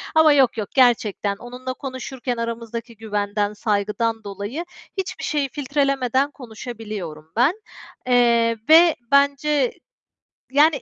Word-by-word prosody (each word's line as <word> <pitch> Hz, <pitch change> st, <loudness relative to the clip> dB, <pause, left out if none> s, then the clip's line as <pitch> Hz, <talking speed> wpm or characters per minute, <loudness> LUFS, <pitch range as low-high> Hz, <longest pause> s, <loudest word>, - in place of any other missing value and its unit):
Ama 315 Hz, -1 st, +7 dB
yok 270 Hz, -4 st, +3 dB
yok 210 Hz, -2 st, -3 dB
gerçekten, 220 Hz, -6 st, +3 dB
onunla 250 Hz, +4 st, -7 dB
konuşurken 260 Hz, -2 st, -5 dB
aramızdaki 230 Hz, 0 st, -5 dB
güvenden, 205 Hz, -1 st, -2 dB
saygıdan 215 Hz, +2 st, -1 dB
dolayı, 205 Hz, -, -5 dB, 0.3 s
hiçbir 385 Hz, 0 st, -4 dB
şeyi 290 Hz, -3 st, 0 dB
filtrelemeden 275 Hz, -1 st, 0 dB
konuşabiliyorum 215 Hz, -, -8 dB
ben, 255 Hz, +9 st, +4 dB, 0.5 s
eee, 235 Hz, -2 st, +3 dB
ve 330 Hz, 0 st, +7 dB, 0.2 s
bence, 280 Hz, -1 st, +3 dB, 0.8 s
yani, 290 Hz, +1 st, +4 dB
245 Hz, 105 wpm, -22 LUFS, 220-280 Hz, 0.8 s, Ama